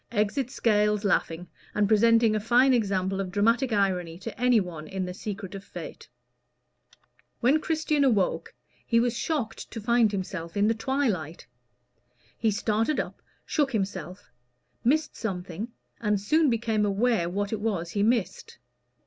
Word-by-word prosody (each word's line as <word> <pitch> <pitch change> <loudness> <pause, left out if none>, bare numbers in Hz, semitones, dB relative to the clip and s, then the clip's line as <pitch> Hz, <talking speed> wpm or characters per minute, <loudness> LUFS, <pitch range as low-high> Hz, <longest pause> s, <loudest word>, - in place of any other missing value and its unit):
Exit 235 +4 0
Scales, 210 -4 +1
laughing, 180 -3 0 0.3
and 210 -1 +3
presenting 225 +1 +4
a - - +1
fine 245 +5 +4
example 195 -4 0
of 190 - -4
dramatic 230 +6 +2
irony 185 -5 0
to 220 +5 -7
any 250 -2 +5
one 165 -5 -6
in 190 +1 -3
the 180 - -5
secret 195 0 -6
of 195 -1 -7
Fate. - - -9 1.3
When 265 +6 +3
Christian 315 -3 +1
awoke, 215 -9 +1 0.3
he 230 - +2
was 240 0 +1
shocked 260 -9 -3
to 225 - -6
find 230 0 +3
himself 185 -2 -5
in 205 +1 +3
the 225 - +3
twilight. 225 - -2 0.9
He 225 - +2
started 220 +6 0
up, - - -5 0.2
shook 285 -4 0
himself, 190 -2 -4 0.5
missed 305 +6 +1
something, 190 -1 -4 0.3
and 210 -2 +1
soon 305 +9 +3
became 225 -2 0
aware 205 -3 +1
what 200 +3 -2
it 220 - -2
was 185 -6 -2
he 200 - -1
missed. 220 - 0
210 Hz, 150 wpm, -27 LUFS, 195-235 Hz, 1.3 s, any